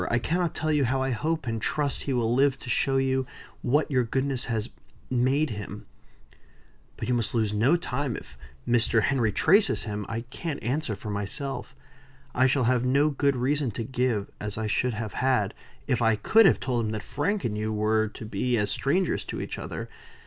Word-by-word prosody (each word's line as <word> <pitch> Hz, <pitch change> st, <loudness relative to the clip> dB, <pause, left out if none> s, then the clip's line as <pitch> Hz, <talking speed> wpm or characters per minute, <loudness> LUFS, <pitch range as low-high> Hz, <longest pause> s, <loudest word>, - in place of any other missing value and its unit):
I 120 Hz, -, +2 dB
cannot 170 Hz, +6 st, 0 dB
tell 155 Hz, 0 st, 0 dB
you 145 Hz, -3 st, +3 dB
how 130 Hz, +2 st, +1 dB
I 135 Hz, -, 0 dB
hope 155 Hz, +5 st, -1 dB
and 115 Hz, -2 st, -2 dB
trust 145 Hz, +2 st, -1 dB
he -, -, +1 dB
will 120 Hz, -2 st, +1 dB
live 135 Hz, +1 st, +3 dB
to 125 Hz, -, -4 dB
show 135 Hz, -1 st, +2 dB
you 130 Hz, -1 st, +1 dB, 0.3 s
what 145 Hz, +5 st, +1 dB
your 130 Hz, -2 st, +3 dB
goodness 130 Hz, +2 st, -1 dB
has 115 Hz, -1 st, -2 dB, 0.4 s
made 130 Hz, +4 st, +2 dB
him." 105 Hz, -2 st, -7 dB, 1.1 s
"But -, -, -4 dB
you 125 Hz, -, +1 dB
must 115 Hz, -2 st, 0 dB
lose 110 Hz, -2 st, +1 dB
no 120 Hz, +10 st, +4 dB
time. 140 Hz, -7 st, -2 dB
If -, -, -9 dB, 0.3 s
Mr. 115 Hz, -2 st, +3 dB
Henry 120 Hz, -5 st, +2 dB
traces 195 Hz, -, +3 dB
him; 105 Hz, -2 st, -4 dB
I 115 Hz, +1 st, -2 dB
can't 140 Hz, +5 st, -5 dB
answer 130 Hz, -1 st, -1 dB
for 105 Hz, +1 st, -6 dB
myself. 105 Hz, +7 st, -4 dB, 0.6 s
I 130 Hz, +1 st, +4 dB
shall 135 Hz, 0 st, +2 dB
have 125 Hz, 0 st, +2 dB
no 140 Hz, +4 st, +3 dB
good 140 Hz, 0 st, +1 dB
reason 135 Hz, +2 st, +1 dB
to 115 Hz, -, -1 dB
give, 125 Hz, -4 st, -1 dB
as 105 Hz, 0 st, -4 dB
I 110 Hz, -, -2 dB
should 120 Hz, +2 st, 0 dB
have 110 Hz, -1 st, -4 dB
had, 125 Hz, -6 st, +1 dB, 0.3 s
if 125 Hz, -4 st, 0 dB
I 115 Hz, -1 st, +4 dB
could 220 Hz, -, +5 dB
have 160 Hz, -, +3 dB
told 120 Hz, -2 st, -1 dB
him 110 Hz, -, -2 dB
that 110 Hz, -2 st, -4 dB
Frank 195 Hz, -, -1 dB
and 105 Hz, -, -1 dB
you 110 Hz, +1 st, -2 dB
were 110 Hz, +1 st, +2 dB
to 110 Hz, +1 st, -9 dB
be 120 Hz, +4 st, 0 dB
as 105 Hz, -2 st, 0 dB
strangers 175 Hz, -, +1 dB
to -, -, -5 dB
each -, -, -5 dB
other. -, -, -5 dB
125 Hz, 200 wpm, -27 LUFS, 110-140 Hz, 1.1 s, could